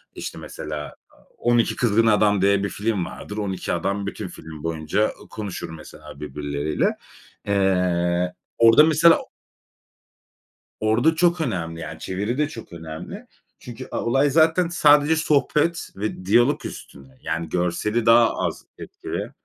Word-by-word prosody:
İşte, - - -6
mesela 75 -1 -7
a - - -26 0.2
On 120 0 +2
İki 115 - +1
Kızgın 115 -1 +2
Adam 105 -2 +3
diye 100 0 +3
bir 100 - -1
film 105 -4 -2
vardır. 105 - -8
On 100 -2 -2
İki 95 - -3
Adam 100 +3 -2
bütün 100 0 -5
film 80 -3 -11
boyunca 85 +6 0 0.2
ı - - -17
konuşur 105 -7 -6
mesela 80 -3 -12
birbirleriyle. 75 0 -2 0.5
Eee, 90 -2 +1 0.2
orada 115 +6 +7
mesela 160 +1 +5 1.6
Orada 115 +9 +2
çok 170 0 +2
önemli, 85 - -3
yani, 80 0 -7
çeviri 105 +7 -3
de 150 0 +1
çok 120 - -10
önemli. 80 -1 -8 0.3
Çünkü 120 -2 -9
a - - -2
olay 135 +4 +3
zaten 165 +3 +3
sadece 150 -2 +4
sohbet 155 +2 +1
ve 100 -2 -4
diyalog 120 +8 +3
üstüne. 65 -1 -10
Yani, 80 0 -3
görseli 100 +6 -1
daha 115 0 +5
az - - -3
etkili. - - -6
105 Hz, 140 wpm, -23 LUFS, 85-125 Hz, 1.6 s, orada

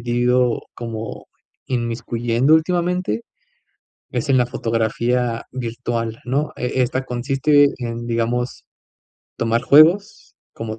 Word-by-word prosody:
ido, 120 0 +1
como 115 -2 -6 0.4
inmiscuyendo 120 +2 +1
últimamente, 175 - 0 0.9
es 125 +4 -2
en 135 - +5
la 125 - +3
fotografía 115 +1 -1
virtual, 115 -2 -3
¿no?, 140 +5 -1
e 125 +1 -1
esta 130 +1 -1
consiste 135 +4 +3
en, 120 -2 -5
digamos, 120 +2 -2 0.7
tomar 115 0 +1
juegos, 165 +10 +4 0.2
como 110 -1 -6
120 Hz, 100 wpm, -20 LUFS, 115-135 Hz, 0.9 s, en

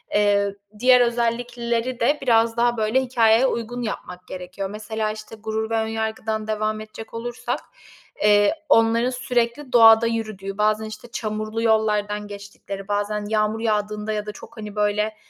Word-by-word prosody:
eee, 200 -1 +2 0.2
diğer 250 +1 +6
özellikleri 235 0 -1
de 285 +6 +2
biraz 230 -2 +3
daha, 240 0 +2
böyle, 220 +4 +2
hikâyeye 240 -1 +4
uygun 245 0 -3
yapmak 180 -5 -6
gerekiyor. 185 +1 -6
Mesela, 215 +1 -3
işte, 215 +1 -9
Gurur 220 0 -3
ve 225 - 0
Önyargı'dan 220 -1 -2
devam 215 0 -1
edecek 215 +1 -10
olursak, 240 +1 -4 0.6
eee, 205 -1 +5 0.2
onların 230 +2 +4
sürekli 250 +1 -1
doğada 225 -1 +8
yürüdüğü, 215 -4 -4
bazen, 215 +1 +1
işte, 215 +2 -9
çamurlu 215 0 -3
yollardan 210 -2 +1
geçtikleri, 200 -1 -8
bazen 205 0 -1
yağmur 215 0 +1
yağdığında 210 -1 -1
ya 210 -1 -3
da 210 - -5
çok, 230 +3 -13
hani, 210 -1 -7
böyle, 210 +1 0
220 Hz, 145 wpm, -23 LUFS, 210-230 Hz, 0.6 s, doğada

